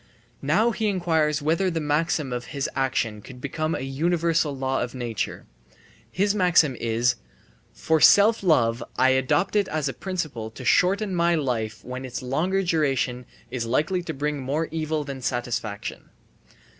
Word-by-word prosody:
Now 205 +12 +2
he 220 -1 -1
inquires 160 -6 +1
whether 165 +5 +2
the 165 -2 -2
maxim 150 -2 0
of 120 0 -4
his 140 -3 -3
action 120 -5 -1
could 125 +4 -12
become 155 +4 -2
a - - -4
universal 160 +2 0
law 130 0 -1
of 120 +1 -4
nature. 120 -5 -4 0.7
His 200 +2 +1
maxim 175 -8 +3
is: 120 +1 +1 0.6
"From 160 -1 +1
self 215 +3 +6
love 120 -10 +2
I 130 - +4
adopt 130 +10 +1
it 205 -2 +3
as 155 -2 -1
a 135 - -2
principle 155 - -4
to 125 +3 -10
shorten 195 - +3
my 170 -1 +2
life 120 -7 -2
when 125 +1 -6
its 130 -1 -6
longer 175 +10 0
duration 135 -7 0 0.2
is 120 -3 -3
likely 155 +9 +1
to 170 - -5
bring 150 +1 -2
more 145 +5 -1
evil 155 -1 -2
than 140 -2 -7
satisfaction." 120 -4 -3
150 Hz, 155 wpm, -25 LUFS, 125-170 Hz, 0.7 s, self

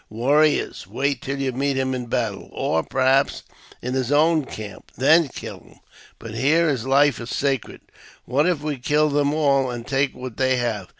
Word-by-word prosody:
Warriors! 145 +7 +1
wait 140 -2 -2
till 140 +1 -4
you 135 -1 -1
meet 135 +2 -1
him 130 0 0
in 125 -2 -4
battle, 115 -4 -3
or, 80 - 0
perhaps, 135 - +1 0.4
in 125 +1 -3
his 130 0 -1
own 155 0 +3
camp, 105 -5 -9
then 160 +5 +5
kill - - -8
him; - - -21 0.4
but 115 -1 -9
here 150 +8 +2
his 130 -4 -2
life 140 +1 +3
is 115 0 -7
sacred. 135 -2 -2 0.4
What 145 +6 +1
if 170 -5 0
we 150 -2 -2
kill 150 +4 +2
them 145 0 +1
all, 140 -4 +2
and 120 -1 -6
take 135 0 0
what 125 -2 -8
they 130 -1 +2
have 120 -4 -2
135 Hz, 185 wpm, -22 LUFS, 125-145 Hz, 0.4 s, then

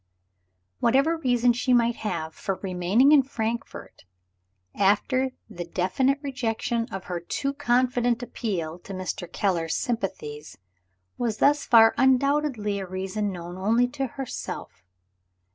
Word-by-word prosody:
Whatever 275 +7 +3
reason 245 -5 +2
she 250 +2 +1
might 235 -1 +3
have 165 -7 -3
for 195 - -3
remaining 190 +9 +3
in 300 -2 +7
Frankfort, 235 -3 -5 0.7
after 235 +7 +2 0.2
the 175 -5 -6
definite 190 +11 0
rejection 235 -3 -2
of 195 -2 -5
her 180 -1 -4
too 275 +11 -3
confident 245 -3 +1
appeal 180 -9 -4
to 195 +2 -8
Mr. 185 -1 -5
Keller's 170 -5 0
sympathies, 155 -10 -4 0.6
was 230 -3 -1
thus 290 +3 +3
far 225 -3 +7
undoubtedly 265 -5 +2
a 190 - -5
reason 190 +3 -3
known 175 0 -7
only 230 +6 +3
to 270 0 -3
herself. 255 - -7
225 Hz, 125 wpm, -25 LUFS, 185-255 Hz, 0.7 s, in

